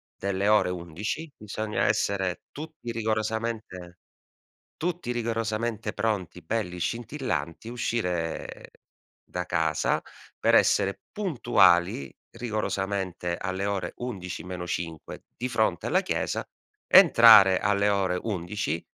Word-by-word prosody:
delle 100 +1 -1
ore 105 -4 +4
11, 90 - -5
bisogna 105 0 -2
essere 100 -3 0
tutti 155 -5 -7
rigorosamente 110 -5 -3 0.8
tutti 170 -6 -3
rigorosamente 115 -2 -2
pronti, 95 -6 -2
belli 90 -2 -3
scintillanti, 110 - -3
uscire 90 -9 -3 0.5
da - - -4
casa - - +1 0.4
per - - +3
essere 100 0 +3
puntuali, 100 - +2 0.2
rigorosamente 100 -6 -2
alle 95 +1 -3
ore 95 -3 -2
11 90 -9 -5
meno 90 -1 -6
5 80 -2 -5
di 125 +2 -3
fronte 110 -8 0
alla - - +2
chiesa, - - -2 0.4
entrare 105 -5 +8
alle 100 +1 +2
ore 95 -3 +1
11, 90 -4 -3
100 Hz, 100 wpm, -27 LUFS, 90-115 Hz, 0.8 s, entrare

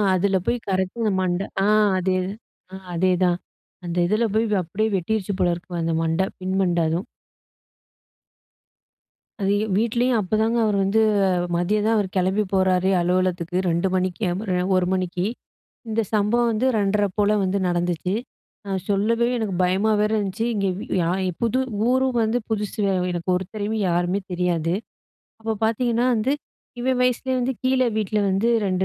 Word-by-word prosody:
அதில 195 +2 +1
போயி 245 - +1
கரெக்ட்டா 190 +4 -1
இந்த 215 - +2
மண்ட 180 0 0 0.2
ஆ - - +3 0.3
அதே 185 0 +1 0.6
அ - - -5 0.2
அதேதான். 180 0 +2 0.5
அந்த 175 0 -4
இதில 215 +5 +2
போய் 225 +1 +3 0.2
அப்டியே 195 +6 -1
வெட்டிருச்சு 200 +2 -1
போல 180 -1 +3
இருக்கு 175 0 -6
அந்த 165 0 0
மண்ட 165 +2 0 0.2
பின் 185 +1 -2
மண்ட 175 -2 +1
அதும். 165 +4 -1 2.4
அது, 195 +1 +2
எ - - -1
வீட்லயும் 235 +2 +2
அப்போதாங்க 220 +4 +1
அவரு 210 -2 +1
வந்து 195 +3 +2 0.6
மதியம் 205 +5 +1
தான் 225 +1 +3
அவர் 205 -2 +1
கெளம்பி 190 +3 +2
போறாரே 190 -1 +2
அலுவலகத்துக்கு 180 0 0
2:00 170 +3 +1
மணிக்கு 185 +2 -1
எ - - 0
மறு 200 -3 -2
எ - - +1
1:00 185 -1 +2
மணிக்கு. 180 -1 -1 0.6
இந்த 220 +1 +1
சம்பவம் 230 +3 +2
வந்து 225 +4 +1
2:30 205 0 +2
போல 210 0 +3
வந்து 190 +1 0
நடந்துச்சு. 175 +1 -1 0.5
நான் 195 -2 -2
சொல்லவே 225 +4 +2
எனக்கு 215 -5 -2
பயமா 190 +4 +2
வேற 210 0 +1
இருந்துச்சு. 205 +2 -2
இங்கே 200 -3 0
வி - - -6 0.2
யா 165 - 0 0.2
இ - - 0
புது 235 +2 +1 0.3
ஊரும் 260 -1 +2
வந்து 220 +3 +1
புதுசு 210 -1 -3
வே 195 - +2 0.2
எனக்கு 175 +1 -4
ஒருத்தரையும் 205 +4 -3
யாருமே 175 +3 0
தெரியாது. 175 -2 0 0.7
அப்போ 225 0 -1
பாத்தீங்ன்னா 235 +1 +1
வந்து, 230 +5 +1 0.5
இவன் 255 0 +1
வயசிலயே 250 +1 +1
வந்து 255 +2 0
கீழ 260 0 +2 0.2
வீட்ல 215 0 0
வந்து 195 +4 +1 0.2
2 190 - 0
195 Hz, 160 wpm, -23 LUFS, 180-220 Hz, 2.4 s, ஆ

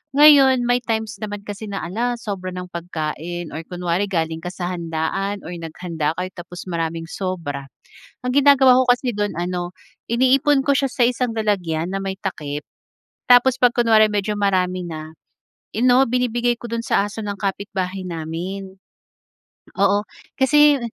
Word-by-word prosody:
Ngayon 280 -3 +7
may 245 0 +3
times 220 -1 -2
naman 205 -1 -5
kasi 205 +1 -6
na, 200 -1 -4
ala 235 +8 -1
sobra 200 -5 -5
ng 180 0 -6
pagkain, 170 0 -4
or 155 - -5
kunwari 180 +1 -1
galing 160 -3 -1
ka 180 - -3
sa 180 -1 -4
handaan 175 +4 -2
or - - -6
naghanda 165 -2 -3
kayo 180 0 -3
tapos 175 0 -9
maraming 165 -1 -2
sobra. 165 -8 -4 0.6
Ang 250 - -1
ginagawa 270 -3 +6
ko - - 0
kasi 245 0 -1
do'n 205 -2 -1
ano, 175 0 -2 0.4
iniipon 270 +3 +3
ko 285 - +4
siya 275 0 +1
sa 245 - +2
isang 250 0 -1
lalagyan 175 -7 0
na 195 - -1
may 190 0 -3
takip. 150 -6 -4 0.7
Tapos 245 +1 +6
pag 245 - +7
kunware 225 -3 +5
medyo 210 +1 0
marami 185 -2 +1
na, 155 -1 -7 0.6
ano 250 +3 +5
binibigay 240 -1 +1
ko 240 - -7
dun 230 0 -2
sa - - +2
aso 215 +2 -7
ng 205 - -2
kapitbahay 195 -1 -3
namin. 180 +4 -5 1.0
Oo, 200 +1 +3 0.3
kasi 295 +1 +5
195 Hz, 155 wpm, -21 LUFS, 175-240 Hz, 1.0 s, Ngayon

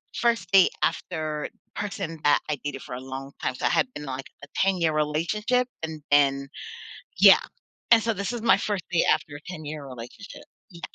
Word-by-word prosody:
first 235 -1 +1
date 190 -2 +7
after 155 -3 -2 0.3
person 195 -6 -4
that 145 - +5
I 150 - +1
dated 140 -2 -4
for 125 - -7
a - - -5
long 135 +1 -7
time. - - -1
So - - -3
I - - +4
had 255 - +1
been, 150 - -7
like, 135 0 -5 0.2
a - - -9
ten-year 180 -5 +2
relationship 190 +12 +1 0.2
and 160 -1 -5
then 140 -1 +3 0.7
yeah. - - +9 0.5
And 230 -1 +8
so 225 -1 +1
this 200 +3 -3
is 235 - -4
my - - +6
first 200 -4 -2
day 170 - +3
after 145 - 0
a 145 - -9
ten-year 155 -4 -7
relationship. 130 - -10 0.3
Yeah. 170 -1 -13
155 Hz, 185 wpm, -26 LUFS, 145-200 Hz, 0.7 s, yeah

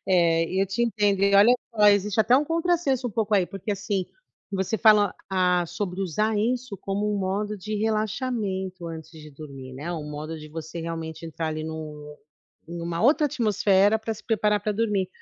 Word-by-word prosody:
É, 170 -3 +3 0.2
eu 195 - +2
te 195 +5 -1
entendo. 205 -4 +1
E 200 0 +4
olha 215 +5 +7 0.2
só, 210 -1 +5
existe 205 +1 +3
até 240 +5 +5
um 290 - +2
contrassenso 330 -6 0
um - - -3
pouco 215 0 0
aí, 185 -3 +3
porque 195 +2 -6
assim, 200 -1 -2 0.5
você 190 +3 -1
fala: 210 -2 +5 0.2
"Ah, 180 -2 +2
sobre 195 +1 -4
usar 215 +5 0
isso 240 -1 -1
como 205 +2 -1
um 205 - 0
modo 205 +2 -2
de 215 +3 -5
relaxamento 215 -4 -2
antes 160 -1 -8
de 155 -2 -12
dormir" 135 -3 -10
né. 145 +7 -6
Um 150 -3 -5
modo 155 +2 -6
de 155 0 -10
você 160 +1 -6
realmente 165 -1 -5
entrar 165 0 -4
ali 155 0 -4
no 150 -2 -7 0.5
em 170 0 -6
uma 170 0 -3
outra 295 +4 +4
atmosfera 210 -3 +3
para 220 0 -3
se 215 - -13
preparar 210 -2 +2
para 210 +1 -1
dormir. 205 -3 0
195 Hz, 190 wpm, -25 LUFS, 165-215 Hz, 0.5 s, olha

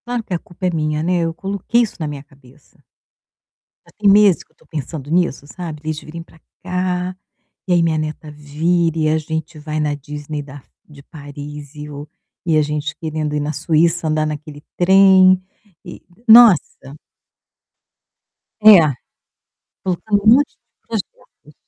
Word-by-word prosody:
Claro 245 -1 -3
que - - -6
a - - -3
culpa 175 +1 -7
é - - 0
minha, 155 -1 -1
né, 180 +1 +1
eu 165 - -3
coloquei 200 +6 -1
isso 220 - -6
na 155 - -3
minha 145 -2 -7
cabeça. 140 -1 -23 1.0
Já - - -21
tem 205 -1 +3
meses 200 -3 +5
que - - -39
eu - - -34
estou - - -28
pensando 150 -2 -6
nisso, 170 -4 0
sabe, 160 -2 -8
deles 155 0 -4
virem 165 +2 -9
pra 165 -1 -18 0.2
cá, 180 0 -2 0.5
e 180 - +2
aí 175 - +3
minha 165 -1 +1
neta 155 0 -5
vir 160 +3 -1
e 155 -1 +1
a 155 - +2
gente 160 0 -5
vai 155 +1 -5
na 150 -1 -1
Disney 150 +1 -7
da 140 0 -12 0.3
de 145 -2 -15
Paris 145 -1 -10
e 150 0 -8
o 145 0 -9 0.4
e 160 -3 +2
a - - +4
gente 150 +1 -4
querendo 155 -2 -4
ir - - 0
na 150 +1 -3
Suíça 165 +2 +1
andar 155 0 0
naquele 150 -1 -7
trem, 185 0 +6 0.5
e - - -10 0.3
nossa! 215 - +5 1.7
É, 215 -2 +10 1.1
faltando 200 +3 -1
um 220 +2 +7
monte 280 +3 +3
de - - -56 0.2
projetos. 200 -8 -8
155 Hz, 165 wpm, -18 LUFS, 150-180 Hz, 1.7 s, É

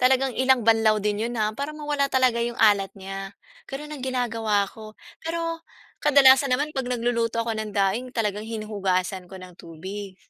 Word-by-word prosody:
talagang 260 +1 +3
ilang 260 -3 +3
banlaw 225 -1 +4
din 210 +1 0
'yon 240 - -5
ha, 215 0 +1
para 285 +2 -3
mawala 295 -2 -1
talaga 255 -3 +2
'yong 235 0 -3
alat 200 -3 +4
niya, 195 0 -7 0.3
gano'n 300 +2 -6
ang 275 - -9
ginagawa 230 -5 0
ko. 215 -1 -11 0.3
Pero 330 0 -3 0.4
kadalasan 270 -2 +6
naman 295 +2 -2
'pag 265 -2 -2
nagluluto 230 -1 0
ako 225 -1 -3
ng 215 -1 -4
daing 205 +5 0
talagang 210 -2 -2
hinuhugasan 195 -4 -2
ko 190 - -10
ng 185 0 -11
tubig. 190 +4 -8
230 Hz, 170 wpm, -24 LUFS, 205-260 Hz, 0.4 s, kadalasan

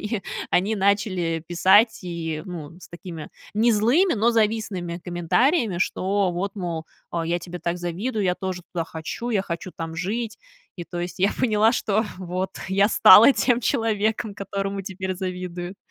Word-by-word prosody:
они 210 -1 -3 0.3
они 200 +5 +2
начали 190 -5 +1
писать, 190 +6 +4
и, 165 -3 -4
ну, 165 -5 -7
с - - -13
такими 170 -2 -8 0.3
не 225 +3 +3
злыми, 250 - +3
но 230 +2 +3
завистными 210 -6 -1
комментариями: 190 - +1
"Что 190 0 0
вот, 195 +4 -3
мол, 170 -4 -4 0.2
а, 165 -1 -2
я 170 +1 0
тебе 175 +1 -8
так 170 0 -2
завидую, 195 +6 -2
я 180 - +2
тоже 185 -2 -5
туда 170 -2 -1
хочу, 160 +9 -6
я 200 -4 +1
хочу 170 0 -5
там 165 0 -5
жить". 210 +6 -3 0.4
И, 175 - -6
то 175 +1 -6
есть, 175 +1 -5
я 195 +3 +3
поняла, 220 -1 +3
что, 220 -2 0
вот, 185 +1 -3 0.2
я 195 +2 +3
стала 220 +4 +8
тем 245 -1 +2
человеком, 220 -3 0
которому 195 0 -3
теперь 190 -1 -4
завидуют. 180 0 -5
190 Hz, 160 wpm, -24 LUFS, 175-215 Hz, 0.4 s, стала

